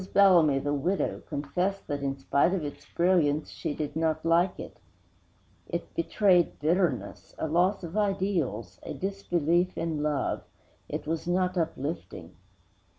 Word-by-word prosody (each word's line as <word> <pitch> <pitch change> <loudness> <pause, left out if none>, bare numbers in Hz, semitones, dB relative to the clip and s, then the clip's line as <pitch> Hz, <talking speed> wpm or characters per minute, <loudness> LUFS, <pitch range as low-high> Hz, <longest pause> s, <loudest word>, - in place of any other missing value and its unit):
Bellamy 175 -8 +6
the 145 +2 -1
widow 175 +7 -1
confessed 180 +7 -2
that, 145 -1 -3
in 135 0 -2
spite 140 +6 +2
of 170 -6 -2
its 145 - -8
brilliance, 165 -4 +2
she 145 - -4
did 150 -1 -4
not 160 0 0
like 170 +2 +3
it. - - -9 0.9
It 170 -1 -4
betrayed 180 +1 +2
bitterness, 160 -3 -1
a - - -2
loss 180 +5 +2
of 170 +2 -6
ideals, 180 - -1
a - - -6
disbelief 180 -2 0
in 160 -3 -2
love; 150 -3 0 0.5
it - - -4
was 160 +2 -3
not 180 +1 +1
uplifting. 165 -2 -4
165 Hz, 140 wpm, -28 LUFS, 145-185 Hz, 0.9 s, Bellamy